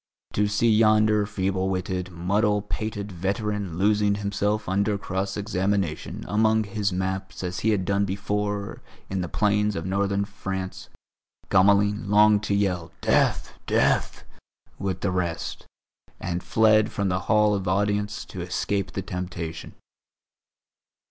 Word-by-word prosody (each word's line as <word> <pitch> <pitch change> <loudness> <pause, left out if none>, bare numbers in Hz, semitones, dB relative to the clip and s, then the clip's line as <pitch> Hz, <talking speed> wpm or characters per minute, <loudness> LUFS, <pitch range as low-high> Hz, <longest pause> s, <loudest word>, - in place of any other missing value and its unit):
To 105 0 +2
see 105 +2 +2
yonder 110 -1 +4
feeble 95 -2 -1
witted 95 -1 -2
muddle 100 +4 +1
pated 105 -1 -4
veteran 100 0 -2
losing 105 +1 +3
himself 105 +1 -1
under 100 +2 +1
cross 95 0 -3
examination 100 -4 -2
among 110 +1 +3
his 105 -1 -2
maps 95 +1 -3
as 90 0 -3
he 110 - +1
had 100 -4 +1
done 100 +1 +1
before 100 +1 -3 0.3
in 95 -1 -1
the 90 - -4
plains 105 +1 +1
of 80 - -4
Northern 100 +1 0
France, 95 -2 -6 0.6
Gamelin 100 +2 +3
longed 105 0 +5
to 100 - +1
yell 90 -4 0
"death! - - +1
death!" - - +1 0.6
with 95 -2 -3
the 100 - 0
rest, 90 -2 -3 0.5
and 90 0 -3
fled 110 0 +3
from 100 -1 -1
the 90 0 0
Hall 105 -1 +4
of 100 -2 -2
Audience 105 +2 0
to 95 - -7
escape 95 +2 -2
the 95 - -3
temptation. 90 -3 -6
100 Hz, 135 wpm, -25 LUFS, 95-105 Hz, 0.6 s, longed